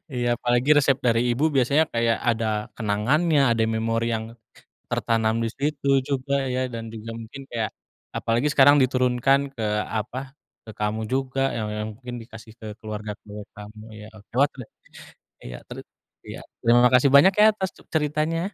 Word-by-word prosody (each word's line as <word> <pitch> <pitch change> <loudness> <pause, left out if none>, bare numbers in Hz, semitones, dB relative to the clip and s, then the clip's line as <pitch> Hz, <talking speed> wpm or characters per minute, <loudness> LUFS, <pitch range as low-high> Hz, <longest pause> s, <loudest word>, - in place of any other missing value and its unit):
Iya, 120 -1 -1
apalagi 120 +3 0
resep 135 -2 +4
dari 115 -1 +3
ibu 125 +5 0
biasanya 140 +5 +3
kayak 115 0 +1
ada 115 -1 +1 0.3
kenangannya, 130 +9 +1
ada 115 -1 +1
memori 115 +1 -1
yang 110 0 -3 0.7
tertanam 110 -1 0
di - - 0
situ 145 0 -2 0.2
juga 140 0 -1 0.2
ya, 130 - 0
dan 115 -1 -5
juga 110 +1 -8
mungkin 120 +5 -10
kayak 115 -2 -2 0.5
apalagi 115 +5 0
sekarang 145 +1 +6
diturunkan 130 +1 +2
ke 115 - -6 0.4
apa, 110 +4 -5 0.5
ke - - -8
kamu 105 +1 -1
juga 135 0 -1 0.2
yang 110 -2 -3
yang 105 - -3
mungkin 125 0 -8
dikasih 110 -1 -13
ke 110 - -9
keluarga-keluarga 105 -1 -8
kamu, 105 +1 -11
iya 105 0 -10
oke. 105 - -18
Wat 145 +1 +3
le - - -7 0.8
iya, - - -7
teri - - -8 0.5
iya, - - -8 0.2
terima 120 +1 +5
kasih 125 +2 +5
banyak 170 +8 +7
ya, 215 - +8
atas 190 -3 -2
ce - - -17
ceritanya. 155 +2 0
120 Hz, 160 wpm, -24 LUFS, 110-140 Hz, 0.8 s, ya